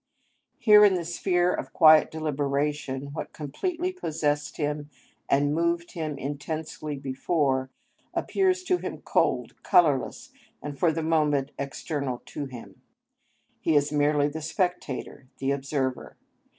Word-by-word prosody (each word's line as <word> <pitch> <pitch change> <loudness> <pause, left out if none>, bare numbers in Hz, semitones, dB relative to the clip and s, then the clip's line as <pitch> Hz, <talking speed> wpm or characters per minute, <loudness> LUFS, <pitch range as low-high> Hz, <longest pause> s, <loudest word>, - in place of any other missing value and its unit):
Here 210 -2 +7
in 200 -2 +6
the 175 -2 -2
sphere 175 +1 +1
of - - -5
quiet 155 -2 +7
deliberation, 145 -2 -2
what 160 - -6
completely 345 - -3
possessed 150 - -2
him 150 0 -2 0.4
and 145 +1 +3
moved 170 +1 0
him 155 -4 -4
intensely 150 +2 -5
before, 135 0 0 0.4
appears 375 -1 +1
to 365 -1 +2
him - - -6
cold, - - 0
colourless, 175 - +2 0.3
and 145 -1 -6
for 170 - +4
the 160 +1 -3
moment 150 -3 +1
external 140 -1 -3
to 145 -2 -4
him; 125 -3 -11 0.8
he 160 - +1
is 145 0 +3
merely 145 0 +3
the 155 +2 -5
spectator, 160 -5 -3
the 135 0 -1
observer. 135 -2 -2
150 Hz, 125 wpm, -27 LUFS, 140-170 Hz, 0.8 s, Here